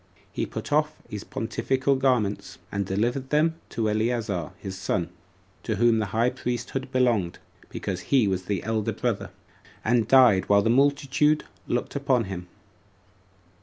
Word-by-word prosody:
He - - -2
put - - -5
off 150 +1 +2
his 105 -1 -6
pontifical 130 +4 0
garments, 125 -6 0
and 100 -1 -2
delivered 120 +7 -1
them 160 +2 +2
to 110 -2 -1
Eleazar 110 - -1
his 95 -1 -6
son, 85 -2 -1 0.5
to 110 - -2
whom 115 +1 +3
the 105 - -1
high 115 +4 +1
priesthood 125 +1 -4
belonged, 120 -9 +1 0.3
because - - -4
he 130 -6 +4
was 95 -1 -1
the 100 -3 -2
elder 110 -2 -1
brother; - - -2 0.6
and 115 -1 +2
died 125 -8 +5
while 100 0 +5
the 115 - +3
multitude 140 +3 +3 0.2
looked 120 - -2
upon 135 -4 +2
him. 95 -3 -6
115 Hz, 145 wpm, -26 LUFS, 100-130 Hz, 0.6 s, died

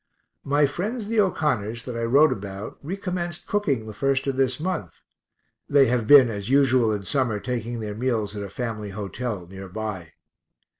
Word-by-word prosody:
My 145 +1 +3
friends 205 - -3
the 230 -1 +1
O'Connors 120 - 0
that 125 - -5
I 115 0 -1
wrote 140 +7 +5
about 100 +1 -6
recommenced 175 0 -4
cooking 145 - 0
the 110 - -7
1st 135 +4 0
of 135 -1 -1
this 130 0 +1
month 160 - -3 0.8
(they 140 -1 +6
have 120 -3 0
been, 140 -2 +9
as 105 -1 -4
usual 130 -4 +4
in 105 -2 -2
summer, 120 -3 0
taking 120 0 -3
their 105 -1 -4
meals 110 -3 -1
at 100 - -4
a 100 - -5
family 110 -2 -4
hotel 100 0 -4
near 95 +2 -9
by). 95 -5 -5
120 Hz, 170 wpm, -24 LUFS, 105-145 Hz, 0.8 s, been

